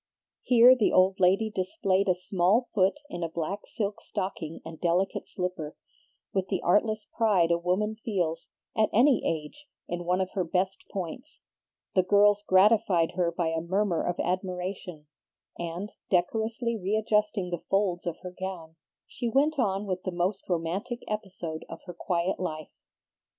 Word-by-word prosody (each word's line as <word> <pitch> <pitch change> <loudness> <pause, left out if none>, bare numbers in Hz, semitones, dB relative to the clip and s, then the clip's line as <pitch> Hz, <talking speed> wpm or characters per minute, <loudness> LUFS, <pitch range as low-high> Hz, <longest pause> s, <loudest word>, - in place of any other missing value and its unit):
Here 245 +1 +7
the 230 -5 +2
old 185 +1 +4
lady 195 +4 +3
displayed 195 - 0
a 180 - +4
small 190 +6 +1
foot 195 -1 +3
in 180 - -6
a 165 - -1
black 170 +5 -4
silk 205 -2 -3
stocking 185 -5 -4
and 160 -1 -9
delicate 180 +3 0
slipper, 180 -5 -4 0.6
with 190 -1 0
the 190 -1 -1
artless 215 +3 +2
pride 200 -8 +2
a 170 - +3
woman 190 +5 0
feels, 170 -6 -2 0.3
at 215 -1 +3
any 250 +2 +5
age, 165 - -4 0.2
in 175 0 -4
one 180 +1 +1
of 185 0 -1
her 190 - -1
best 185 +3 -1
points. 195 - -6 0.5
The 185 - +5
girls 205 +2 +4
gratified 195 -3 +4
her 175 -1 0
by 170 -1 -1
a 165 0 -1
murmur 185 0 0
of 175 - -2
admiration, 180 -2 -3 0.5
and, 175 +4 -4 0.2
decorously 225 +6 0
readjusting 210 -1 0
the 175 - -3
folds 190 -3 +1
of 170 - -2
her 180 - -6
gown, 170 -4 -6 0.3
she 240 - -4
went 285 +5 +2
on 200 -3 +1
with 185 -2 -2
the 185 - -3
most 180 +3 -2
romantic 180 +8 -2
episode 190 -7 -5
of 165 - -8
her 180 - -7
quiet 175 +1 -1
life. 155 -4 -4
185 Hz, 155 wpm, -28 LUFS, 175-210 Hz, 0.6 s, Here